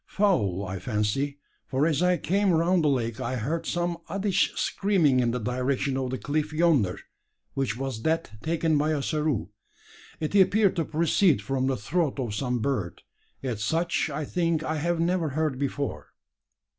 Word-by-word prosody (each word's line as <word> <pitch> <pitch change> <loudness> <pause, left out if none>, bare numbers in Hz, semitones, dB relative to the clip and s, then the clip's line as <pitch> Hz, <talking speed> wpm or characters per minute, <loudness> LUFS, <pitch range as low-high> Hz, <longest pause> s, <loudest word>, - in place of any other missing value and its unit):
"Fowl, 100 - +1
I 95 0 -5
fancy: 110 +8 -1 0.3
for 135 +3 +1
as 160 -1 +1
I 180 0 +3
came 195 +3 +1
round 170 +1 +3
the - - +3
lake 120 -4 0
I 130 +1 -2
heard 145 +8 -2
some 175 -1 -1
oddish 195 -2 +1
screaming 175 -10 +2
in 120 -1 +2
the 120 - -1
direction 125 +3 -1
of 130 -1 -1
the 130 - -2
cliff 150 +2 -2
yonder, 155 - +2 0.5
which 130 -5 -1
was 135 -4 -4
that 160 -8 -2
taken 160 0 +1
by 155 +2 +1
Ossaroo. 150 - -1 0.7
It 155 +2 -3
appeared 200 0 +4
to 165 - +1
proceed 165 +1 +3
from 130 -1 -1
the 135 - 0
throat 145 - -1
of 120 -5 -2
some 125 +3 -1
bird; 110 -10 -2 0.4
yet 120 -6 -2
such 165 +8 0
I 150 +1 -3
think 165 -1 0
I 155 0 -2
have 170 +2 0
never 170 -1 +1
heard 145 -2 -1
before." 140 0 -3
145 Hz, 170 wpm, -26 LUFS, 125-170 Hz, 0.7 s, appeared